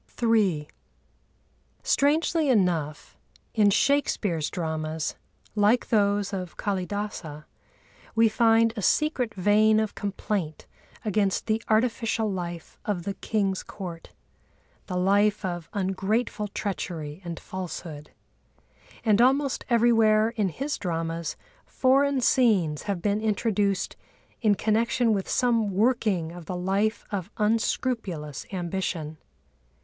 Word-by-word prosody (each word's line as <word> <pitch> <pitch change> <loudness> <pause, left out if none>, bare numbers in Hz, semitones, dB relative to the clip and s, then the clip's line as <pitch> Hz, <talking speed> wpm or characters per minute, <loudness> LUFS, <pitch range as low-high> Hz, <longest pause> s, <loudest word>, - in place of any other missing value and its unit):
III 205 -10 +2 1.2
Strangely 310 +1 +2
enough, 170 - 0 0.3
in 210 -2 +4
Shakespeare's 200 - +1
dramas, 160 -2 -3 0.4
like 215 +3 +2
those 205 -2 +2
of 180 -3 -5
Kâlidâsa, 190 -6 -4 0.7
we 225 0 +5
find 225 0 +3
a 210 - -4
secret 255 - +1
vein 215 +3 +4
of 220 -1 -1
complaint 195 -5 -3 0.4
against 200 -2 +1
the 220 0 0
artificial 225 -1 +1
life 175 -3 -6
of 200 -6 -2
the 200 - -3
king's 195 -1 -1
court—the 180 0 -10
life 200 +2 +2
of 175 -3 -4
ungrateful 210 +3 -1
treachery 175 -6 -5
and 170 -1 -6
falsehood. 170 -5 -7 1.0
And 215 0 +4
almost 270 +2 +2
everywhere, 225 -2 +4
in 215 -4 -1
his 280 - -4
dramas, 165 -2 -3 0.3
foreign 275 +1 +2
scenes 200 - +3
have 190 -4 -2
been 205 0 +1
introduced 205 -3 0 0.5
in 215 -3 +4
connection 225 +2 +1
with 195 -2 -2
some 230 -4 +2
working 200 -5 +1
of 170 -2 -10
the 180 - -3
life 195 +4 0
of 195 -2 -3
unscrupulous 210 - -1
ambition. 175 -4 -3
205 Hz, 105 wpm, -26 LUFS, 180-225 Hz, 1.2 s, we